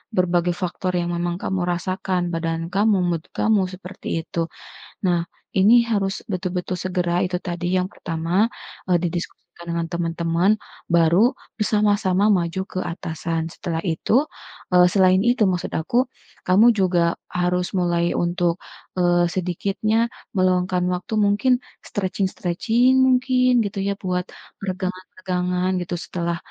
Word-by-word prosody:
berbagai 175 -1 +2
faktor 180 +1 -2
yang 175 0 -2
memang 175 0 -1
kamu 190 -1 -1
rasakan 185 +1 -1
badan 165 0 -1
kamu, 210 +1 +3
mood 165 -1 -1
kamu 215 -2 +3
seperti 185 +1 -10 0.2
itu 170 - -5 0.7
nah 175 -1 +3 0.4
ini 205 +5 +6 0.2
harus 195 -2 +1 0.2
betul-betul 185 0 -2
segera 180 -2 -1
itu 180 0 -1
tadi 175 0 -3
yang 185 - +2
pertama, 170 +5 0 0.4
eee, 180 - +4
didiskusikan 175 0 -6
dengan 170 0 -1
teman-teman 170 +2 +1 0.4
baru 170 - +4 0.2
bersama-sama 205 -2 +2
maju 175 -1 0
ke - - -3
atasan 165 -1 -3
setelah 165 -3 -4
itu, 170 +3 -1 0.6
eee, 180 0 +7
selain 185 0 +4
itu 240 +2 +2
maksud 180 - -2
aku, 240 +11 +1 0.4
kamu 200 +5 +6
juga 185 -2 +3 0.4
harus 180 0 +1
mulai 175 -1 +1 0.2
untuk, 175 0 +1 0.4
eee, 175 -1 +3
sedikitnya 200 +5 0 0.3
meluangkan 185 -1 +2
waktu 180 +4 -5
mungkin 205 +6 +3 0.4
stretching-stretching 200 +5 +1
mungkin 255 0 +3
gitu 200 -1 -4
ya - - +1
buat 180 -1 0 0.3
peregangan 185 -1 -4
peregangan 180 0 -1
gitu 175 - -4
setelah, 170 -1 -2
180 Hz, 125 wpm, -22 LUFS, 175-195 Hz, 0.7 s, eee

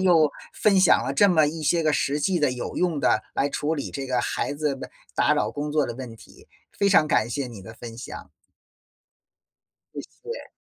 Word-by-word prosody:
又 165 -5 +4 0.2
分 200 -3 +3
享 - - +5
了 - - -2
这 205 - +5
么 160 -5 +4
一 160 +1 -4
些 165 +3 +2
个 155 - +2
实 145 0 0
际 180 +3 +1
的、 145 -4 +2
有 125 - -5
用 170 -5 +1
的 - - +2
来 140 - +1
处 155 +2 -1
理 140 - -4
这 135 -1 -5
个 125 -2 0
孩 - - -2
子 145 -1 -1
的 135 - -9 0.2
打 - - +3
扰 - - 0
工 145 +1 -4
作 150 -1 +2
的 120 - -4
问 120 -2 -8
题， - - -18 0.3
非 200 - +3
常 170 -6 +5
感 110 -6 +2
谢 130 +2 -2
你 115 -5 -10
的 110 +4 -11
分 115 0 -9
享。 - - -9 1.6
谢 - - -5 0.3
谢。 - - -9
145 Hz, 225 characters per minute, -25 LUFS, 125-165 Hz, 1.6 s, 享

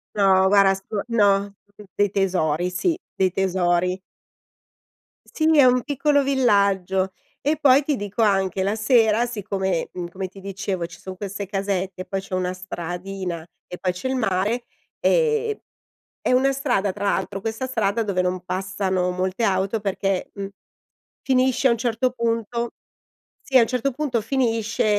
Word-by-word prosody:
No 190 -2 +4
guarda 195 -1 +5
so 195 +2 -4
no 200 -3 +3 0.2
d 210 - -12
dei 205 -1 +2
tesori, 180 -4 0
sì, 325 - 0 0.2
dei 190 -1 +2
tesori! 180 -1 +1 1.3
Sì, 310 - -3
è 280 - +8
un 250 0 +4
piccolo 285 +1 +2
villaggio! 200 -8 +2 0.3
E 300 +3 +1
poi, 280 -1 +5
ti 290 0 0
dico 205 +1 -3
anche, 195 -2 +2
la 200 +2 0
sera 225 0 +3
siccome, 195 -6 -2
mhmm, 175 -1 -5
come 185 +2 -5
ti 195 +1 -14
dicevo 195 -2 -3
ci 175 0 -14
son 190 -1 -8
queste 200 +1 -5
casette 195 -1 -2
e - - -11
poi 195 - -3
c'è 190 -1 -7
una 185 0 -1
stradina 180 -1 -5 0.2
e 180 - -8
poi 180 -1 0
c'è 180 +9 -4
il 260 - -1
mare, 215 +2 0 0.4
ehm 455 -3 +2 0.6
è - - 0
una 265 +2 +4
strada, 245 -8 0
tra 205 +1 -6
l'altro, 200 0 -1
questa 225 +5 -3
strada 225 -3 0
dove 200 -4 -1
non 180 0 -2
passano 190 -1 -1
molte 185 +4 -1
auto 195 +2 +1
perché, 195 -1 -1
mhmm, 200 -1 -5 0.7
finisce 260 0 +2
a - - +3
un 230 - -1
certo 240 +2 0
punto 235 0 -2 0.7
sì, 265 - 0
a 235 - +7
un - - +3
certo 255 +2 0
punto 265 -4 -1
finisce, 230 -3 0
200 Hz, 160 wpm, -23 LUFS, 190-240 Hz, 1.3 s, è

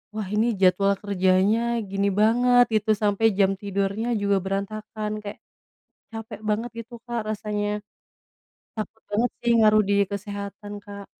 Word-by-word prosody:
wah, 210 -3 -3
ini 220 +1 +1
jadwal 195 +1 +3
kerjanya 195 +2 +2 0.2
gini 200 0 -1
banget, 245 +2 +5
gitu, 215 0 +2
sampai 205 +2 +2
jam 195 -1 +4
tidurnya 200 +3 -2
juga 200 -1 +2
berantakan, 210 +2 -4
kayak, 205 - -7 0.7
capek 225 -1 -7
banget 225 +3 0
gitu, 235 +2 -10
Kak, 235 -3 -3
rasanya. 210 -1 -2 1.1
Takut 220 0 -6
banget, 235 +4 +1
sih, 235 - +2
ngaruh 215 0 +5
di 200 - +2 0.2
kesehatan, 200 0 -6
Kak. 200 -1 -9
210 Hz, 135 wpm, -24 LUFS, 200-220 Hz, 1.1 s, banget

